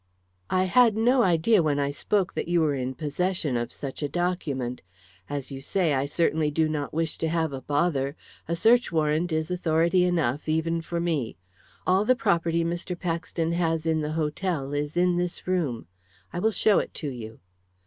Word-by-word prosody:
"I 185 - +2
had 220 +3 +4
no 245 +3 +4
idea, 185 +2 +4
when 150 -3 +1
I 140 0 0
spoke, 195 +6 0
that - - -3
you 175 0 +2
were 155 -2 +2
in 130 -1 -3
possession 155 -1 -1
of 120 0 -2
such 135 0 -7
a 145 - -1
document. 140 -8 -2 0.5
As 140 -1 -4
you 135 0 -6
say, 170 +1 +1
I 135 +1 0
certainly 155 0 +1
do 155 +1 +1
not 150 -2 -3
wish 160 0 -2
to 165 - 0
have 160 -3 0
a 135 - -5
bother. 145 -1 0 0.3
A 170 - 0
search 235 +6 +4
warrant 160 +1 +1
is 160 +1 -1
authority 170 +1 +2
enough, 155 -6 0
even 165 +1 0
for 170 +1 -3
me. 160 -9 -1 0.5
All 185 +2 +3
the 255 +4 +3
property 170 -7 +1
Mr. 175 +1 -3
Paxton 165 -1 -2
has 165 -2 0
in 160 -1 +1
the 150 0 -3
hotel 155 -2 -2
is 145 +3 -2
in 180 0 +3
this 175 0 -2
room. 165 -11 -1 0.5
I - - -2
will 220 - +3
show 215 -1 +3
it - - -5
to 155 - -4
you." 115 -4 -8
165 Hz, 190 wpm, -26 LUFS, 145-180 Hz, 0.5 s, had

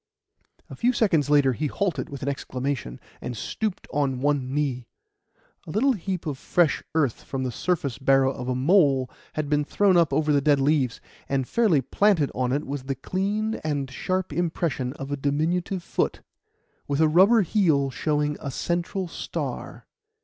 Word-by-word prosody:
A - - -9
few 245 +2 +2
seconds 170 - +2
later 145 -3 +4
he 150 +5 -2
halted 185 +3 -2
with 140 -2 -7
an - - -3
exclamation, 130 - -3 0.2
and 120 -2 -5
stooped 210 - -3
on 140 -3 0
one 140 -2 0
knee. 135 -4 -1 0.8
A - - -8
little 230 - +2
heap 190 -5 -3
of 145 -4 -4
fresh 175 -4 +2
earth 140 -7 +1
from 135 -2 -4
the 130 - -2
surface 140 -3 -2
burrow 135 -1 +4
of 125 -1 -5
a 130 - 0
mole 135 -3 +3 0.2
had 155 -1 -2
been 150 0 +2
thrown 190 +4 +3
up 170 -2 +3
over 155 -1 +2
the 140 - +3
dead 145 0 +3
leaves; 135 -3 +1 0.3
and 135 -2 0
fairly 210 - +3
planted 180 - +2
on 125 -1 -1
it 145 +3 -1
was 140 -1 -5
the 135 0 -2
clean 205 - -2
and 145 -3 -2
sharp 185 +6 -2
impression 160 -7 -1
of 135 -1 -7
a - - +1
diminutive 165 +6 -1
foot, - - -1 0.7
with 140 0 -1
a 160 - +5
rubber 195 +8 +5
heel 155 -8 +2
showing 150 +1 0
a 140 - -5
central 175 +6 -2
star. - - -5
145 Hz, 170 wpm, -25 LUFS, 135-180 Hz, 0.8 s, a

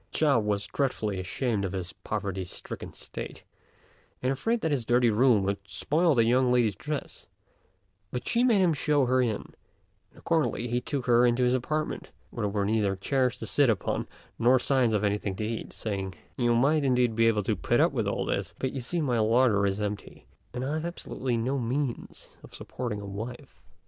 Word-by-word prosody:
Chao 145 -6 +3
was 105 -2 -1
dreadfully 110 -8 -1
ashamed 105 +3 -1
of 95 -1 -3
his 90 -2 -4
poverty 100 -3 -4
stricken 90 - -8
state, - - -8 0.8
and 130 - +2
afraid 225 - 0
that 160 - 0
his 135 -5 0
dirty 120 0 +3
room 115 -2 +4
would 100 +1 -1
spoil 160 - +1
the 115 - +5
young 125 +2 +3
lady's 120 -4 +3
dress; 150 - -6 0.8
but 125 - -5
she 240 +1 +2
made 230 -6 +4
him 175 -3 +4
show 145 -2 +2
her 130 +1 +3
in, 115 -4 +1
and - - -11 0.6
accordingly 160 -7 0
he 120 +1 -1
took 135 0 -3
her 120 0 +5
into 120 +1 +3
his 125 0 +3
apartment, 150 +5 -2 0.2
where - - -3
there - - -1
were 100 0 -1
neither 105 -2 +1
chairs 125 +5 0
to - - -6
sit 140 -3 +3
upon, 110 -5 -1 0.3
nor 125 +3 +5
signs 125 -3 +2
of 105 - 0
anything 100 -1 0
to 110 - -3
eat, 115 +1 -4
saying, 95 -3 -4 0.2
"You 120 -2 +2
might, 145 +5 +3
indeed, 125 -4 +2
be 115 0 +4
able 105 -2 +2
to 110 +1 0
put 80 - +1
up - - +4
with - - -1
all - - -1
this; - - -2
but 130 - -2
you 135 - -4
see 165 +8 -2
my 125 -6 +1
larder 110 -2 +3
is 100 +1 -1
empty, 105 -1 -5 0.3
and 125 +1 -4
I 140 - -2
have 160 +1 -2
absolutely 130 -7 -3
no 130 +4 -1
means 125 +1 -3
of - - -12
supporting 120 -5 -5
a - - -7
wife." 110 +5 -7
120 Hz, 200 wpm, -28 LUFS, 105-135 Hz, 0.8 s, the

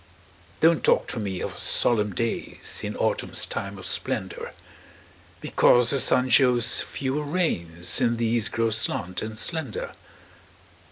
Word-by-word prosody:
Don't 165 0 +4
talk - - +3
to 115 - -2
me 95 -4 -3
of - - -5
solemn 105 -5 +1
days 115 +4 -3
In - - -4
autumn's - - +1
time 100 0 -5
of 95 - -9
splendor, - - -3 0.9
Because 120 -1 +4
the 140 - +1
sun 125 +1 +2
shows 125 -3 +4
fewer 140 +2 -3
rays, 85 - -1
And 115 -1 +2
these 115 -1 +1
grow 115 0 0
slant 90 -4 -1
and 110 0 -5
slender. 145 -4 -3
115 Hz, 130 wpm, -25 LUFS, 105-130 Hz, 0.9 s, Don't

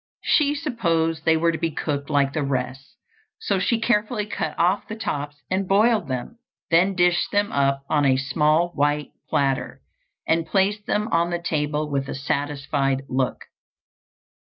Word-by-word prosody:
She 295 -1 +3
supposed 170 - -1
they 160 0 +4
were 165 +1 +2
to 160 - -4
be 165 - 0
cooked 145 -2 -3
like 140 -2 +2
the 155 - -1
rest, 135 0 -3 0.4
so 200 - 0
she 230 +4 +1
carefully 215 -1 0
cut 160 -7 -4
off 180 +4 +1
the 220 - -5
tops 145 -9 -4 0.2
and 190 0 0
boiled 210 -1 +3
them, 130 - -5 0.3
then 185 +4 +4
dished 175 -1 +2
them 205 0 +1
up 140 0 +1
on 150 -1 +2
a 130 -2 +4
small 150 +5 +2
white 145 -2 0 0.2
platter, 135 -2 0 0.5
and 165 0 +1
placed 205 +1 +1
them 210 +1 0
on 170 -4 +2
the 175 - -1
table 150 -3 -1
with 135 -2 -2
a - - -4
satisfied 140 -1 -1
look. 130 0 -1
160 Hz, 160 wpm, -23 LUFS, 140-195 Hz, 0.5 s, they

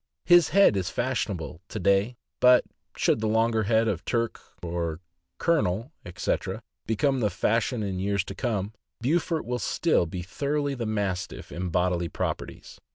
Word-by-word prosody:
His 175 -1 +6
head 200 - +5
is 95 -2 -1
fashionable 100 - -2
to - - -5
day, 100 +6 +2 0.2
but 125 0 +6 0.3
should - - +2
the 110 - 0
longer 110 0 +2
head 110 +1 +3
of - - -1
Turk, 115 -1 -1 1.0
Colonel, 130 - +1
etc., 90 - -3 0.2
become 135 +5 +1
the 105 -3 +2
fashion 115 +4 0
in 95 -2 -3
years 100 0 0
to 100 - -7
come, 105 -3 -2 0.3
Beaufort 160 +4 0
will 125 +1 -2
still 155 - +1
be 90 +2 -5
thoroughly 145 +8 -1
the 120 -4 -3
Mastiff 100 -4 -3
in 90 +1 -3
bodily 90 0 0
properties. - - -5
110 Hz, 150 wpm, -27 LUFS, 95-125 Hz, 1.0 s, His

